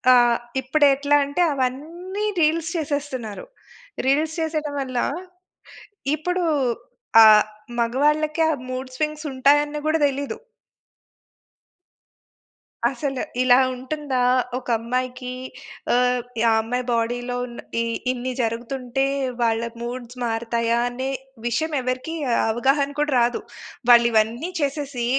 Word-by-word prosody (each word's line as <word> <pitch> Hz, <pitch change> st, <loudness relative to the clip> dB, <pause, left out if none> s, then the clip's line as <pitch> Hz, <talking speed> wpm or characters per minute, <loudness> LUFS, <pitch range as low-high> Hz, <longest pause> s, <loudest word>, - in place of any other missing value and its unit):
ఆహ్, 240 Hz, -1 st, +5 dB, 0.3 s
ఇప్పుడు 290 Hz, +3 st, +3 dB
ఎట్లా 285 Hz, +1 st, +2 dB
అంటే? 285 Hz, +5 st, -1 dB
అవన్నీ 330 Hz, +10 st, -3 dB, 0.2 s
రీల్స్ 320 Hz, +1 st, +2 dB
చేసేస్తున్నారు. 285 Hz, -, -4 dB, 0.6 s
రీల్స్ 305 Hz, +4 st, +2 dB
చేసేయడం 310 Hz, -2 st, -2 dB
వల్ల 255 Hz, -2 st, -4 dB, 1.2 s
ఇప్పుడు 360 Hz, +4 st, -2 dB, 0.8 s
ఆహ్, 215 Hz, -1 st, +8 dB, 0.3 s
మగవాళ్ళకి 300 Hz, +6 st, +1 dB
ఆ -, -, +3 dB, 0.2 s
మూడ్ 255 Hz, +1 st, -4 dB
స్వింగ్స్ 305 Hz, +2 st, -2 dB
ఉంటాయన్ని 290 Hz, +3 st, +3 dB
గూడా 315 Hz, +1 st, +2 dB
దెలీదు. 280 Hz, 0 st, -4 dB, 2.5 s
అసలు 270 Hz, -4 st, -3 dB, 0.2 s
ఇలా 250 Hz, -1 st, +6 dB, 0.2 s
ఉంటుందా 265 Hz, +1 st, -3 dB, 0.4 s
ఒక 255 Hz, -, -9 dB
అమ్మాయికి? 250 Hz, +2 st, -3 dB, 0.6 s
ఆహ్, 250 Hz, 0 st, +3 dB, 0.3 s
ఆ -, -, +4 dB
అమ్మాయి 245 Hz, +3 st, -2 dB
బాడీ‌లో 245 Hz, +1 st, -1 dB
ఉన్న 240 Hz, -1 st, -10 dB, 0.2 s
ఈ -, -, +1 dB, 0.3 s
ఇన్ని 255 Hz, 0 st, -3 dB
జరుగుతుంటే 245 Hz, +3 st, -2 dB, 0.4 s
వాళ్ళ 225 Hz, -1 st, +2 dB, 0.2 s
మూడ్స్ 245 Hz, 0 st, -6 dB
మారతాయా 230 Hz, 0 st, 0 dB
అనే 260 Hz, +2 st, -4 dB, 0.4 s
విషయం 305 Hz, +7 st, -1 dB
ఎవ్వరికీ 255 Hz, +6 st, -3 dB, 0.4 s
అవగాహన 270 Hz, +5 st, +2 dB
కూడా 295 Hz, -2 st, +1 dB
రాదు. 240 Hz, 0 st, +1 dB, 0.5 s
వాళ్ళు 235 Hz, -1 st, +8 dB
ఇవన్నీ 225 Hz, +8 st, +1 dB
చేసేసి 280 Hz, -4 st, -2 dB
260 Hz, 105 wpm, -23 LUFS, 240-295 Hz, 2.5 s, ఆహ్